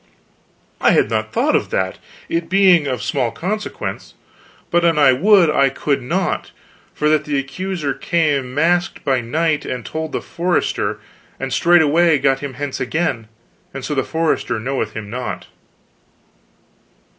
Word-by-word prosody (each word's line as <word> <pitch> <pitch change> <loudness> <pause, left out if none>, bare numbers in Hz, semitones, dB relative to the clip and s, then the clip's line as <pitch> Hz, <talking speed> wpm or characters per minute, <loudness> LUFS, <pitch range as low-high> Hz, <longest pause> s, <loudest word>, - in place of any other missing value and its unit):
"I - - +5
had - - +2
not - - -1
thought - - +1
of - - 0
that, 95 0 -2 0.3
it 165 0 -2
being 185 -4 +5
but 135 - -1
of - - -8
small 120 - 0
consequence. 195 - -5 0.6
But 175 0 +3
an 165 -2 +3
I 145 -3 +6
would, 190 +5 +5
I 140 -2 +3
could 140 +2 -1
not, 175 +9 -2 0.4
for 150 - -1
that 155 -1 +2
the 145 -2 -1
accuser 145 +2 -3
came 145 -7 0
masked 175 +4 +1
by 130 -2 +2
night, 150 +5 0
and 125 -3 -5
told 160 0 -4
the - - -2
forester, 170 - -1 0.4
and 135 -1 -3
straightway 165 0 +4
got 135 -1 +1
him 140 -2 -6
hence 145 +1 -4
again, 130 -3 -2 0.5
and 135 - -5
so 150 - -2
the 135 -2 0
forester 160 -8 -1
knoweth 115 -3 -3
him 105 -2 -7
not." 125 +2 -5
150 Hz, 155 wpm, -19 LUFS, 130-170 Hz, 0.6 s, I